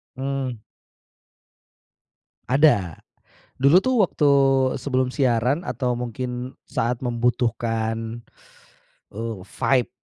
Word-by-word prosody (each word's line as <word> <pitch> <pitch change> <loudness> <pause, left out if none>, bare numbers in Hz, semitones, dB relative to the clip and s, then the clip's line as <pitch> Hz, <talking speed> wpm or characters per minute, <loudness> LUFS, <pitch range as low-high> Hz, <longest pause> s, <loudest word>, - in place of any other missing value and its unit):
Hmm. 130 -4 -4 1.9
Ada. 125 - +3 0.6
Dulu 140 +6 +6
tuh 260 0 +1
waktu 150 -5 +2 0.5
sebelum 130 -1 0
siaran, 130 +4 +1
atau 125 -3 -1
mungkin 125 +1 -5
saat 120 +1 -1
membutuhkan, 115 -1 -1 0.9
eee, 115 0 -4
fight 125 +1 +1
125 Hz, 80 wpm, -23 LUFS, 115-135 Hz, 1.9 s, Dulu